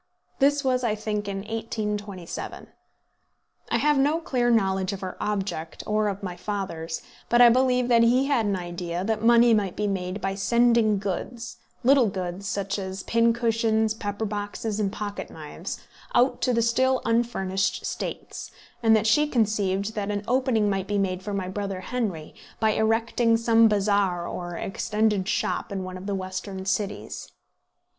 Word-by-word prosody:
This 285 +1 +3
was, 255 -1 +1
I 220 -3 +1
think, 210 -1 -3
in 195 -1 -3
1827. 210 -4 -5 1.0
I - - +2
have 295 -1 +3
no 295 +4 +2
clear 250 -7 0
knowledge 190 -4 +2
of 195 - -6
her 185 -1 -5
object, 195 -6 -3
or 215 0 +1
of 200 0 -4
my 180 -2 -4
father's; 175 -6 -4 0.3
but 240 - +4
I 245 -1 +9
believe 250 0 +3
that 235 -1 +5
he 245 +3 +4
had 265 -6 +1
an 200 - +1
idea 175 0 -4
that 220 +1 -1
money 235 0 +6
might 200 -4 +1
be 210 - -1
made 190 -1 -2
by 195 -1 -2
sending 230 +1 +3
goods, 210 +5 -4 0.3
little 260 -1 +5
goods, 185 0 -4
such 200 +1 -2
as 190 0 -5
pin 230 0 +3
cushions, 225 -2 +1
pepper 205 0 -4
boxes, 205 +1 -3
and 200 -2 0
pocket 205 -1 -5
knives, - - -7 0.4
out 250 +2 +3
to 255 - +2
the 230 -1 +2
still 260 +3 +2
unfurnished 230 -5 0
States; - - -5 0.3
and 225 -1 +5
that 220 0 +2
she 295 +8 +4
conceived 210 -4 0
that 205 -2 -3
an 205 0 -2
opening 250 -4 +2
might 195 -1 -1
be 205 - 0
made 185 -2 -1
for 205 - -5
my 190 -2 -2
brother 195 -1 -4
Henry 190 -8 -3 0.3
by 220 -1 +3
erecting 225 +1 +2
some 230 0 +5
bazaar 200 -4 +1
or 175 -1 -5
extended 210 -1 0
shop 215 - -1
in 195 -1 -3
one 185 0 -6
of 185 +2 -8
the 200 - -1
Western 190 0 -5
cities. 195 +2 -3
210 Hz, 165 wpm, -25 LUFS, 195-230 Hz, 1.0 s, I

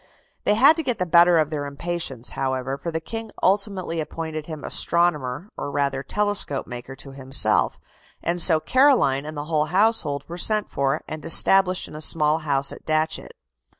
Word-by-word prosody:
They 210 - +3
had 275 +8 +6
to 325 - -2
get 250 -4 -2
the 180 - -1
better 170 0 +5
of 155 -1 +1
their 145 -2 -3
impatience, 140 -4 -3
however, 130 0 -3
for 170 - -6
the 160 0 -3
King 225 +7 -7
ultimately 190 -3 0
appointed 155 -1 -6
him 155 -3 -8
astronomer 170 -1 +1
or - - -5
rather 140 -1 -1
telescope 205 -3 -1
maker 125 +2 -9
to 135 - -9
himself, 130 -5 +1 0.4
and 175 +1 -1
so 160 -2 +6
Caroline 240 - +2
and 155 -1 -7
the 145 - -4
whole 155 -1 0
household 170 -6 +1
were 175 +1 -8
sent 215 +2 0
for, 140 +2 -1
and 155 0 -7
established 185 +2 +3
in - - -13
a 155 - -6
small 155 0 +2
house 140 -3 +1
at - - -11
Datchet. 155 0 -1
155 Hz, 180 wpm, -23 LUFS, 140-180 Hz, 0.4 s, had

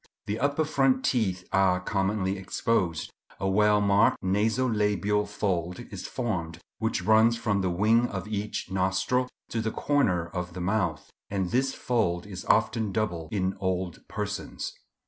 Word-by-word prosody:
The 105 +2 -2
upper 145 +4 +1
front 135 -3 +2
teeth 95 -7 0
are 95 -1 +3
commonly 95 +1 0
exposed. 95 -3 -1 0.3
A 95 - -1
well 105 +2 +4
marked 100 +2 +4
naso 110 +7 +2
labial 105 -2 +1
fold 90 -3 -2
is - - -6
formed, 85 -10 -3 0.2
which 110 0 -1
runs 110 +2 +5
from 105 -4 0
the 95 - 0
wing 110 +7 +3
of 95 +1 -5
each 105 -2 -3
nostril 95 +7 +1 0.2
to 115 - -1
the 110 - -1
corner 110 - +1
of 90 0 -4
the 90 - -6
mouth; 90 -4 -1 0.2
and 95 -3 -1
this 130 +2 +1
fold 95 -8 0
is 95 -3 -8
often 110 -1 +2
double 90 -6 -2
in 95 -2 0
old 95 -3 -2
persons. - - -4
100 Hz, 150 wpm, -27 LUFS, 95-110 Hz, 0.3 s, runs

